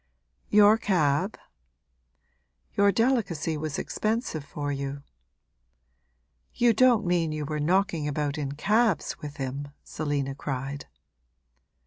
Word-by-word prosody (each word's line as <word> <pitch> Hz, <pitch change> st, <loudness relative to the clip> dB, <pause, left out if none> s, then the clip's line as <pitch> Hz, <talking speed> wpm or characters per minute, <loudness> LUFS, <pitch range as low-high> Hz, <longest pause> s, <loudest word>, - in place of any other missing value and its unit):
'Your 210 Hz, +1 st, +6 dB
cab?' 180 Hz, -1 st, +1 dB, 1.4 s
'Your 200 Hz, 0 st, +4 dB
delicacy 200 Hz, -, 0 dB
was 150 Hz, -1 st, -4 dB
expensive 215 Hz, -, -2 dB
for 145 Hz, 0 st, -4 dB
you!' 140 Hz, 0 st, -4 dB, 1.5 s
'You 240 Hz, -1 st, +4 dB
don't 235 Hz, -2 st, +4 dB
mean 175 Hz, -3 st, +1 dB
you 155 Hz, -1 st, -3 dB
were 150 Hz, +1 st, -3 dB
knocking 170 Hz, -1 st, +1 dB
about 145 Hz, 0 st, -1 dB
in 140 Hz, -3 st, -3 dB
cabs 210 Hz, +4 st, +1 dB
with 145 Hz, -1 st, -8 dB
him!' 135 Hz, +1 st, -4 dB, 0.2 s
Selina 145 Hz, -3 st, -2 dB
cried. 135 Hz, 0 st, -5 dB
155 Hz, 105 wpm, -27 LUFS, 145-200 Hz, 1.5 s, Your